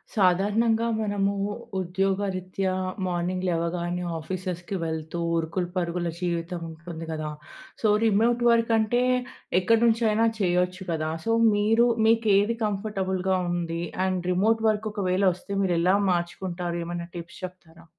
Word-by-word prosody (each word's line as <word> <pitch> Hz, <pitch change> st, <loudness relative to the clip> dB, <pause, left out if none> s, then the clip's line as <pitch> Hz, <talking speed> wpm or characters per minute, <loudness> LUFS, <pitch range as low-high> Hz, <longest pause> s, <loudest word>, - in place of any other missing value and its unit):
సాధారణంగా 210 Hz, +4 st, +3 dB
మనము 200 Hz, -2 st, 0 dB, 0.5 s
ఉద్యోగరీత్యా 190 Hz, 0 st, -1 dB, 0.3 s
మార్నింగ్ 180 Hz, +1 st, -1 dB
లేవగానే 175 Hz, +1 st, -1 dB, 0.2 s
ఆఫీసెస్‌‌కి 180 Hz, +2 st, -4 dB
వెళ్తూ 160 Hz, +1 st, -4 dB, 0.2 s
ఉరుకులు, 165 Hz, +2 st, -1 dB
పరుగుల 175 Hz, -1 st, -1 dB
జీవితం 170 Hz, 0 st, -2 dB
ఉంటుంది 165 Hz, 0 st, -8 dB
గదా! 155 Hz, -1 st, -3 dB, 0.5 s
సో, 220 Hz, -, +3 dB, 0.2 s
రిమోట్ 225 Hz, +3 st, +3 dB
వర్క్ 230 Hz, 0 st, +3 dB
అంటే 225 Hz, +3 st, +2 dB, 0.6 s
ఎక్కడినుంచైనా 225 Hz, +2 st, +3 dB
చేయొచ్చు 180 Hz, 0 st, +1 dB
కదా! 155 Hz, -1 st, -1 dB
సో 225 Hz, -, +1 dB, 0.2 s
మీరు 220 Hz, +3 st, +3 dB, 0.2 s
మీకేది 220 Hz, -1 st, +3 dB
కంఫర్టబుల్‌గా 190 Hz, -3 st, -1 dB
ఉంది, 170 Hz, -1 st, -2 dB, 0.2 s
అండ్ 185 Hz, -1 st, -1 dB
రిమోట్ 220 Hz, +5 st, +2 dB
వర్క్ 215 Hz, 0 st, -1 dB
ఒకవేళ 190 Hz, -2 st, 0 dB
వస్తే 190 Hz, -, -12 dB
మీరు 180 Hz, -2 st, +1 dB
ఎలా 180 Hz, +3 st, +4 dB, 0.2 s
మార్చుకుంటారు? 175 Hz, 0 st, -2 dB
ఏమైనా 170 Hz, 0 st, -5 dB
టిప్స్ 170 Hz, +1 st, -8 dB
చెప్తారా? 170 Hz, -2 st, -13 dB
185 Hz, 115 wpm, -26 LUFS, 175-210 Hz, 0.6 s, ఎలా